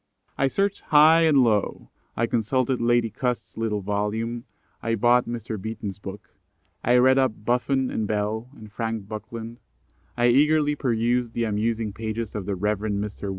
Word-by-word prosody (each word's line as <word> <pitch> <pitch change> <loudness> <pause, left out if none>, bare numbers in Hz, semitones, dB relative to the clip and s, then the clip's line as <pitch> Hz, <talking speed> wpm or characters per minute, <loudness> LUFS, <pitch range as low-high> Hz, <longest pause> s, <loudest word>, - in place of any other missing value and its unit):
I 135 - +2
searched 195 +7 -1
high 160 +2 +6
and 140 -4 +5
low; 105 -4 0 0.3
I 115 - +2
consulted 125 +3 0
Lady 120 -1 +2
Cust's 125 +2 -3
little 110 -2 -2
volume; 105 +4 -2 0.4
I 115 0 0
bought 120 +3 +3
Mr. 115 -3 -5
Beeton's 105 -2 -5
book; 100 0 -9 0.5
I 120 - +3
read 130 +2 +5
up 115 -5 -1
Buffon 125 +2 +1
and 110 - -2
Bell, 110 +3 -2
and 110 -1 -12
Frank 110 -2 -4
Buckland; 115 +2 -7 0.6
I 120 0 +4
eagerly 150 +3 +3
perused 120 -2 0
the 120 - -1
amusing 110 0 -1
pages 110 0 -4
of 100 -3 -5
the 100 - -1
Rev. 105 +2 -1
Mr. 105 -1 -3
115 Hz, 155 wpm, -24 LUFS, 105-125 Hz, 0.6 s, high